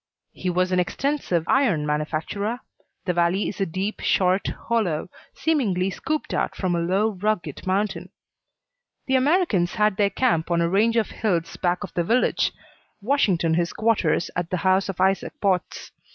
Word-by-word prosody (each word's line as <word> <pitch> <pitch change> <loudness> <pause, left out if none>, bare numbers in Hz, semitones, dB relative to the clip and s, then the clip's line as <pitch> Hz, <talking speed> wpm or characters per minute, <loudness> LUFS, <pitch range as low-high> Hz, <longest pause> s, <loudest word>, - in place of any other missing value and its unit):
He 185 - -3
was 180 +1 +1
an 185 - +2
extensive 180 - -1
iron 215 - +2
manufacturer. 155 +10 -2 0.4
The 180 - +1
valley 175 +3 +1
is 200 - -5
a 195 - +1
deep, 190 +5 -3
short 185 +1 +2
hollow, 185 -8 -2 0.2
seemingly 200 - +1
scooped 310 +8 -3
out - - -1
from 185 -2 -1
a - - 0
low, 190 +6 +1
rugged 190 -6 -3
mountain. 195 +2 -1 1.0
The 265 - +1
Americans 260 - +2
had 210 -2 +2
their 205 -2 +3
camp 200 -10 +1
on 170 -1 +2
a 170 - +2
range 215 +6 +2
of 225 - +1
hills 175 -7 -1
back 180 +2 0
of 195 - -8
the 175 - 0
village, 235 +8 +2 0.5
Washington 200 - +1
his 170 +1 0
quarters 215 -7 +1
at 175 -1 -2
the 185 - -1
house 190 +1 +3
of 190 - -5
Isaac 190 +1 +1
Potts. 190 -4 -1
190 Hz, 165 wpm, -24 LUFS, 175-215 Hz, 1.0 s, their